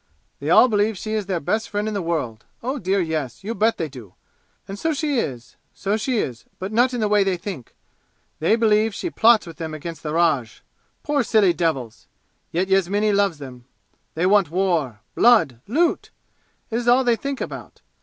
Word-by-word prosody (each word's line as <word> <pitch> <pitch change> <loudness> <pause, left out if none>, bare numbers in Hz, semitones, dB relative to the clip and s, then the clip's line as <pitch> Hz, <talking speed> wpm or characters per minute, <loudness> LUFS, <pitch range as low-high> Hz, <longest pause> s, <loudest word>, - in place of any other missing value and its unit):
They - - -4
all - - +7
believe 210 -2 +1
she 215 - -5
is 210 -3 -2
their 185 -3 -1
best 215 +9 -1
friend 205 +1 -2
in 215 - -2
the 200 - -2
world 150 -10 -3 0.2
oh, 260 +3 -2
dear 195 +2 0
Yes, 155 -8 -3
you 220 +3 -3
bet 220 +2 +1
they 165 - -2
do! 120 -10 -12 0.5
And 195 +1 -7
so 320 -1 0
she 290 -3 0
is 125 - -5 0.2
so 200 +2 -1
she 240 +3 -1
is 125 - -3
but 190 +2 -5
not 245 +3 +3
in 240 - -2
the 215 - +2
way 205 -1 +3
they 190 -2 0
think! 175 - -8 0.6
They 165 +8 +3
believe 220 -1 +2
she 350 - -4
plots 230 -4 +4
with 165 -1 -11
them 160 -2 -5
against 160 0 -7
the 150 - -4
Raj! 155 -9 0 0.4
Poor 295 -1 +1
silly 215 -6 +3
devils! 140 -9 -2 0.4
Yet 180 +3 -1
Yasmini 195 +2 +2
loves 200 -5 +2
them! 125 -4 -10 0.5
They 165 +3 0
want 195 -3 +4
war 165 - 0
blood 215 - +4
loot! 325 - +1 0.6
It 225 - 0
is 240 0 -3
all 250 +2 +5
they 240 -2 +3
think 275 +3 -4
about! - - -7
195 Hz, 195 wpm, -22 LUFS, 160-225 Hz, 0.6 s, all